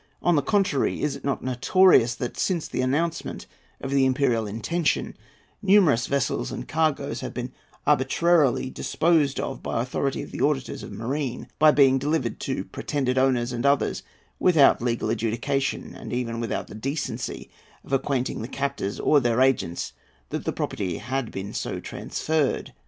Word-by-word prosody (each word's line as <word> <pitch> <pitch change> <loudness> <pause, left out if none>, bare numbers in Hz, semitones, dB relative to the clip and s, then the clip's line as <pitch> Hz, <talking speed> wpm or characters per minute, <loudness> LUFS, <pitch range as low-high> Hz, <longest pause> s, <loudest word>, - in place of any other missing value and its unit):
On 175 - +4
the 145 - +3
contrary, 195 -9 +1
is 150 -2 0
it - - -11
not 140 -1 -2
notorious 130 0 +4
that, 125 0 -4
since 175 -5 -1
the - - -2
announcement 160 +6 -1 0.3
of 135 - -5
the 135 -1 +4
imperial 125 -4 +1
intention, 145 +11 -1 0.5
numerous 190 - +4
vessels 140 -2 -1
and - - -6
cargoes 155 -2 0
have - - -6
been - - -4 0.3
arbitrarily 135 -1 +3
disposed 155 -3 +1
of 135 - -4
by - - -2
authority 130 +3 -1
of - - -10
the - - -5
auditors 140 -3 0
of - - -9
marine, 130 +3 -3
by 155 +1 +7
being 135 -3 +5
delivered 150 +4 -1
to 135 - -2
pretended 130 -3 -1
owners 125 -2 +2
and 120 -1 -3
others 140 0 +2 0.4
without 160 -10 +5
legal 115 -2 -1
adjudication, 120 +5 -1
and - - -8
even 115 -2 -2
without 115 - -2
the - - -12
decency 135 +8 -4 0.3
of - - -8
acquainting 135 -2 0
the 115 - -4
captors 135 -7 -3
or 150 - +4
their 120 -2 +1
agents 105 -10 +1 0.4
that - - -4
the - - 0
property 90 -4 -3
had 130 -1 -3
been 95 +1 -6
so - - -3
transferred? 155 -4 -2
135 Hz, 160 wpm, -25 LUFS, 120-150 Hz, 0.5 s, by